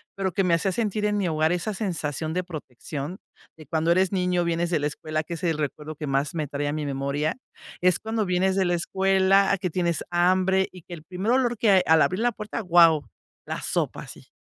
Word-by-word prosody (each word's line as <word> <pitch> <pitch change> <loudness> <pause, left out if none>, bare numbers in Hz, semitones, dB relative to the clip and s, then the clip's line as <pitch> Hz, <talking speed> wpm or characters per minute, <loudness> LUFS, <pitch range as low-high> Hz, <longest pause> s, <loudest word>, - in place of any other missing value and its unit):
pero 190 -2 -2
que 195 - +1
me 175 -2 +2
hacía 185 +3 +1
sentir 210 -1 -1
en 210 0 +1
mi 195 - 0
hogar, 155 0 +1
esa 180 +5 -1
sensación 160 -6 -3
de 180 +1 -1
protección 150 +1 -7 0.4
de 155 - -12
cuando 160 +3 0
eres 185 +1 +3
niño, 180 -2 +1
vienes 170 0 0
de 165 -3 +1
la 145 - 0
escuela, 155 +1 -3
que 170 - -7
es 170 +2 -7
el 165 -3 +1
recuerdo 150 +1 -4
que 150 - -6
más 140 +3 0
me 155 -2 -2
trae 145 +1 -3
a 145 - -1
mi 155 -1 -3
memoria, 140 - -2 0.4
es 180 -1 +3
cuando 220 -1 -2
vienes 185 +1 +1
de 190 -1 +2
la 175 - +1
escuela 190 +2 +3
a - - +2
que 180 0 -2
tienes 170 -1 -1
hambre 185 +2 +3
y 180 -3 -13
que 175 - -11
el 155 -3 -9
primer 185 +7 -2
olor 245 -2 +2
que 215 -1 +3
hay 190 -2 +6
al 160 0 +6
abrir 185 - 0
la 240 +1 +2
puerta, 210 +1 -5
wao, 170 -5 +4 0.4
la - - -3
sopa, - - -2
así, - - -12
175 Hz, 235 wpm, -25 LUFS, 155-190 Hz, 0.4 s, hay